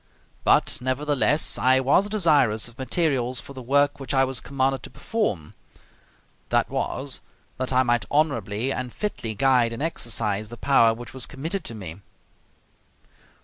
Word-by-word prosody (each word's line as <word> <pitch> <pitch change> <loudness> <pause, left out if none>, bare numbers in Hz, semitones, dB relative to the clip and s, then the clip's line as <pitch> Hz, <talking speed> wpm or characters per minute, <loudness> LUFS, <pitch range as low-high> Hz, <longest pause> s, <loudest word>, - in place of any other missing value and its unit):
But - - +3
nevertheless 145 +2 +1
I 130 +1 +5
was 145 +10 +3
desirous 150 - +3
of 120 +2 -15
materials 130 -3 0
for 140 - -11
the 130 - -8
work 145 +4 +2
which 135 0 -4
I 135 - +5
was 130 -1 -1
commanded 135 -1 -1
to - - -9
perform; 105 - -3 1.0
that - - +1
was, - - -3 0.4
that 130 0 -2
I 130 0 +4
might 120 -5 +1
honorably 135 -5 0
and 125 -1 -4
fitly 115 - -4
guide 125 0 +3
and 115 +5 -4
exercise 110 -9 -1
the 120 - -9
power 115 -4 +4
which 120 +1 -10
was 130 -2 -4
committed 160 +6 -4
to 115 - -6
me. 90 -6 -8
130 Hz, 150 wpm, -24 LUFS, 115-145 Hz, 1.0 s, I